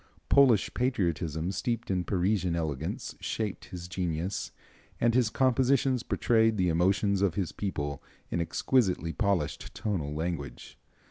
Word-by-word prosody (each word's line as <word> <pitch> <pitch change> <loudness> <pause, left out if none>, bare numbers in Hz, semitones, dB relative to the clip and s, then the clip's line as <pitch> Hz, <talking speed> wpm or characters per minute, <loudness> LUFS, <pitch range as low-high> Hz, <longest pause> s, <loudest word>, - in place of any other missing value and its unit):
Polish 130 -7 +5
patriotism 85 - -1
steeped 115 +4 -2
in 90 -1 0
Parisian 95 -2 +1
elegance 80 -2 -3
shaped 105 -3 -3
his 90 -2 -8
genius, 90 +1 -3 0.5
and 120 0 +3
his 120 -3 +3
compositions 130 0 +2
portray 115 -2 +2
the 95 -5 +1
emotions 95 +4 +2
of 95 -5 +2
his 95 -4 -1
people 75 -8 -3 0.3
in 85 - 0
exquisitely 90 -2 +1
polished 100 -8 -1
tonal 90 -9 -2
language. 75 -6 -4
95 Hz, 125 wpm, -29 LUFS, 85-115 Hz, 0.5 s, Polish